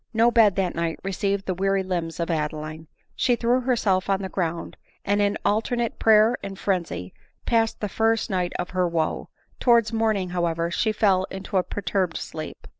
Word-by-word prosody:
No 230 +2 +5
bed 220 -5 +5
that 190 -3 0
night 170 -1 -2
received 195 +1 -1
the 185 - -1
weary 195 +1 +1
limbs 175 -3 -3
of 170 +1 -1
Adeline. 155 0 -3 0.3
She 245 - +2
threw 240 +2 +1
herself 215 -7 +1
on 195 0 +1
the 190 - -4
ground, 170 -3 -3 0.3
and 205 +1 +2
in 200 0 +1
alternate 235 +2 0
prayer 220 +1 +5
and 195 -1 -7
frenzy 165 - -2 0.3
passed 225 -1 +1
the 210 - -1
first 225 +2 +1
night 180 -5 -1
of 180 - -4
her 185 -1 +1
wo; 165 -2 -2 0.3
towards 235 -2 +3
morning, 215 -5 +1
however, 170 -1 -1
she 220 +5 +1
fell 195 -3 +2
into 195 +1 -7
a - - +5
per 205 - -6
turbed 185 -2 0
sleep. 155 -1 -7
195 Hz, 185 wpm, -24 LUFS, 175-220 Hz, 0.3 s, No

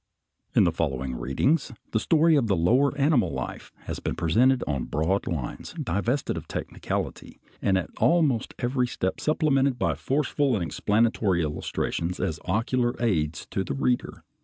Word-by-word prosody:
In - - +6
the 85 - +3
following 65 -5 -2
readings 70 - 0 0.2
the 110 - +2
story 160 +5 +4
of 125 -6 +2
lower 125 +11 +3
animal 145 -2 +3
life - - -6
has - - -5
been - - -3
presented 125 +10 +3
on 70 -3 -2
broad 80 +6 0
lines, 70 -8 -4
divested 115 - -1
of - - -7
technicality, - - -4 0.2
and 95 -2 +2
at 95 - -3
almost 155 -9 +2
every 125 0 0
step 95 -5 -2
supplemented 140 -4 +2
by 85 -7 +1
forceful 135 - 0
and 95 - -1
explanatory 105 +1 +1
illustrations 85 +3 -2
as 80 -4 -2
ocular 120 +5 0
aids 80 -10 0
to 95 - -1
the - - -4
reader. 125 -2 -1
110 Hz, 150 wpm, -26 LUFS, 85-135 Hz, 0.2 s, In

